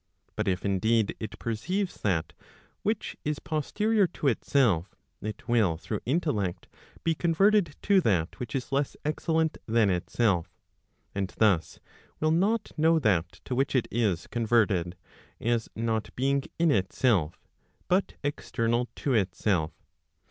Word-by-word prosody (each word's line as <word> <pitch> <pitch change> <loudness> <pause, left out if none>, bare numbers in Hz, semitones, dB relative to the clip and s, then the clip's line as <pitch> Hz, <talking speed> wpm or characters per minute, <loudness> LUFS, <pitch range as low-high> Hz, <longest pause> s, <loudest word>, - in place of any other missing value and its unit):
But 110 -1 -2
if 90 0 0
indeed 110 +2 +2
it 110 - -6
perceives 180 - -2
that 90 -6 0 0.5
which 215 +1 -2
is 150 0 -1
posterior 205 +8 +1
to 150 -4 0
itself, 115 - +1 0.3
it 110 +1 -6
will 110 -9 +3
through 105 +5 -4
intellect 125 - -1 0.4
be 165 - +2
converted 170 +1 +3
to 200 -2 +4
that 95 - 0
which 120 -2 -5
is 135 0 -3
less 140 +1 0
excellent 160 +1 0
than 110 -3 +3
itself; 90 0 +1 0.6
and 100 -1 -2
thus 95 -8 +2 0.4
will 155 0 +2
not 205 +7 +1
know 160 +1 +5
that 100 - +1
to - - -3
which 135 +2 0
it 125 - +2
is 105 -7 0
converted, 110 -6 +1 0.4
as 115 -1 0
not 110 -1 -1
being 140 +2 +1
in 170 -2 +3
itself, 95 - +1 0.5
but 185 +2 +1
external 120 -4 -1
to 140 - -1
itself. 95 -5 +1
120 Hz, 135 wpm, -28 LUFS, 100-155 Hz, 0.6 s, know